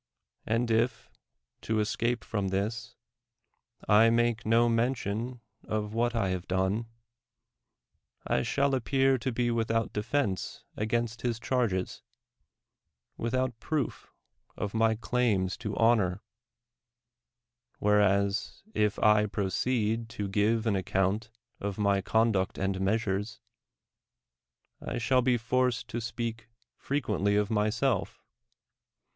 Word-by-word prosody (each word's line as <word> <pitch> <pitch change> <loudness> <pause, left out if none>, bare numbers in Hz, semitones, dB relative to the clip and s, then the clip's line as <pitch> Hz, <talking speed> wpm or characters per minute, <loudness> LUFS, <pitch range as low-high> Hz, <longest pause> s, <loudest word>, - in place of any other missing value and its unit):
And 115 +1 +1
if, 115 +3 0 0.5
to 110 -1 -1
escape 115 +3 0
from 100 -3 -2
this, 110 +5 -3 0.9
I 110 +2 +6
make 120 -1 +1
no 115 +2 +4
mention 115 0 -1 0.2
of 105 -1 -3
what 120 +1 0
I 105 -5 +1
have 90 -1 -3
done, 95 +5 0 1.4
I 65 - +1
shall 140 - +1
appear 135 +1 +2
to 130 +2 -2
be 120 0 0
without 115 -1 0
defense 105 -2 -2
against 115 +1 -1
his 120 -2 -1
charges, 115 -7 -1 1.1
without 130 0 -1
proof 155 -4 -3 0.5
of 100 - -3
my 110 0 +3
claims 110 -5 0
to 105 -4 -5
honor; 105 -5 +3 1.5
whereas, 100 - +1
if 105 -1 +1
I 105 0 +4
proceed 110 +3 -1
to 105 - -2
give 110 +3 +1
an 110 -3 +2
account 95 +3 0 0.3
of 100 -1 -4
my 100 -2 +2
conduct 110 -2 +1
and 95 0 -1
measures, 105 +1 -1 1.4
I - - -4
shall 120 +3 +2
be 125 -1 +2
forced 125 +1 0
to 120 - -3
speak 115 -1 -4 0.3
frequently 105 -8 0
of 105 +2 +1
myself. 110 +1 0
110 Hz, 110 wpm, -29 LUFS, 100-120 Hz, 1.5 s, I